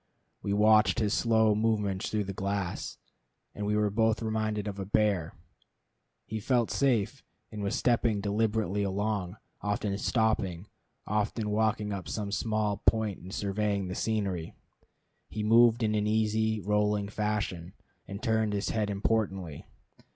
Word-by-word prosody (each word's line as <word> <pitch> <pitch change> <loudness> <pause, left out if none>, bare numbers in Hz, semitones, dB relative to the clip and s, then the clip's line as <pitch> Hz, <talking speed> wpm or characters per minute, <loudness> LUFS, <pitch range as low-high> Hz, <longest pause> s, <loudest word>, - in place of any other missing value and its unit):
We 100 - -3
watched 105 +2 +5
his 105 -3 +1
slow 110 -2 +3
movements 105 -3 0
through 105 -1 0
the 100 0 -5
glass, 100 -1 -3 0.6
and 105 0 -4
were 105 0 +1
both 110 +1 +1
reminded 110 -1 -1
of 100 -1 -5
a 95 - -3
bear. 100 -6 +1 0.9
He 110 - -4
felt 120 0 +1
safe, 130 -1 +1 0.3
and 105 -1 -6
was 100 -1 -1
stepping 115 -3 +2
deliberately 105 -1 0
along, 100 -1 -2 0.2
often 105 -1 -1
stopping, 105 -7 0 0.4
often 105 +1 -1
walking 105 -1 +1
up 95 -5 -5
some 100 +3 -3
small 110 -1 0
point 110 -3 +2
and 95 - -10
surveying 100 -1 -1
the - - -3
scenery. 100 -8 -2 0.7
He 105 - -4
moved 115 +2 +5
in 110 -1 +1
an 105 0 +1
easy, 110 0 +1
rolling 105 +1 +1
fashion, 105 -4 -2 0.3
and 100 +4 -7
turned 110 -3 +1
his 100 0 -1
head 105 -2 0
importantly. 100 -6 -1
105 Hz, 140 wpm, -29 LUFS, 100-110 Hz, 0.9 s, watched